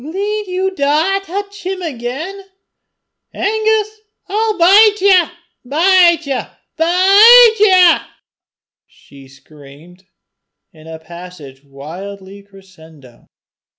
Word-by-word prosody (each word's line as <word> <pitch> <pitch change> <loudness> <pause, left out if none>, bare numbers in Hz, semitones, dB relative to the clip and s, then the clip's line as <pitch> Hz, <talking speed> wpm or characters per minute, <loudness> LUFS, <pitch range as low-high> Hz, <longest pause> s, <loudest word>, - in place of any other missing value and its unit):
"Gien 310 +6 -10 0.3
ye 375 +1 -3
daur 315 +4 -1
to 390 - -19
touch 400 +2 -8
'im 370 0 -6
again, 305 +7 -7 0.9
Angus, 435 +1 -2 0.3
I'll 430 0 -2
bite 410 +4 +4
ye 375 -3 +3 0.4
bite 340 +4 +2
ye 275 -2 -3 0.3
BITE 400 +8 +5
YE," 370 -4 +4 0.9
she 140 -1 -19
screamed, 150 +6 -19 0.7
in 155 0 -18
a 160 0 -9
passage 160 -5 -14
wildly 190 +8 -12
crescendo. 160 -10 -20
320 Hz, 95 wpm, -14 LUFS, -, 0.9 s, BITE